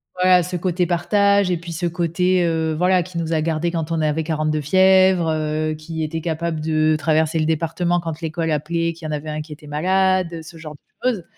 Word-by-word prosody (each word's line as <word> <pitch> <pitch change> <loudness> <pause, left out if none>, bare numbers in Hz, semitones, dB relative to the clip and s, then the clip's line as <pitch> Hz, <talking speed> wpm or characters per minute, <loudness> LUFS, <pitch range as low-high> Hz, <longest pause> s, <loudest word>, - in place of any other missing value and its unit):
Voilà, 180 0 +4
ce 180 +1 -5
côté 180 0 0
partage 200 +2 +2
et 175 - +1
puis 170 +1 -9
ce 170 +2 -3
côté, 175 +1 +1
heu, 160 -1 0
voilà, 180 +2 +2
qui 175 0 -6
nous 165 0 -2
a 160 - +1
gardés 165 +1 -1
quand 165 -1 -3
on 165 -1 0
avait 155 +1 0
40 155 -1 -1
de 155 0 0
fièvre, 185 +2 +4
heu, 155 0 -1
qui 160 +1 -6
était 160 +1 -3
capable 165 0 -2
de 155 0 +1
traverser 160 +1 +1
le 155 - +1
département 165 +2 0
quand 165 -2 -5
l'école 165 0 -2
appelait, 165 +3 -1
qu'il 165 -1 -12
y - - -3
en - - -3
avait 150 +1 -4
un 155 0 -3
qui 150 0 -9
était 150 0 -14
malade, 185 +3 +1
heu, 165 - -6
ce 160 +1 -12
genre 155 -2 -9
de 145 - -17 0.3
choses. 210 -9 -3
165 Hz, 230 wpm, -21 LUFS, 155-180 Hz, 0.3 s, Voilà